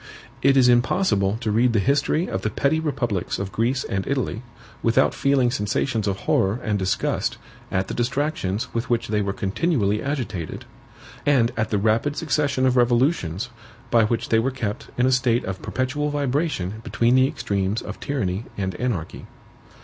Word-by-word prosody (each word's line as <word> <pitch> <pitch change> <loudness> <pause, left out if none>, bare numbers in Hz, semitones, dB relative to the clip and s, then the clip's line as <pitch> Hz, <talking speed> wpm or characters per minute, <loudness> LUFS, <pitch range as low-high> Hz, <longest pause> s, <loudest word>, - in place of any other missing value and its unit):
It 135 0 +4
is 130 -2 +6
impossible 120 - +2
to 110 -3 -1
read 115 +3 +3
the 110 - +3
history 140 - +1
of 95 - -3
the 110 - -1
petty 140 +8 +1
republics 125 - -2
of 100 -1 -4
Greece 125 +5 0
and 95 -1 -3
Italy 130 -4 -1 0.4
without 115 +3 +3
feeling 135 -3 +2
sensations 110 0 -1
of 100 -1 -2
horror 100 +5 +1
and 105 -2 0
disgust 95 0 -1 0.3
at 95 +1 0
the - - -4
distractions 120 -5 -1
with 115 +2 -2
which 120 -3 0
they 105 -1 +1
were 100 -1 -1
continually 105 - 0
agitated, 110 - -4 0.6
and 130 -5 +3
at 110 -1 -1
the 105 - +1
rapid 110 +8 +1
succession 140 -3 0
of 130 -1 +3
revolutions 120 - +2 0.4
by 115 -2 +5
which 115 +1 -1
they 110 - +4
were 120 +4 +1
kept 110 -6 -4
in 125 - +3
a 130 - +3
state 125 -2 +2
of 95 -1 -5
perpetual 145 +3 -1
vibration 140 - -1
between 120 +1 +1
the 130 +1 +5
extremes 100 -4 -1
of - - -7
tyranny 105 -7 -2
and 95 -2 -2
anarchy. 115 -10 -3
120 Hz, 170 wpm, -23 LUFS, 100-135 Hz, 0.6 s, is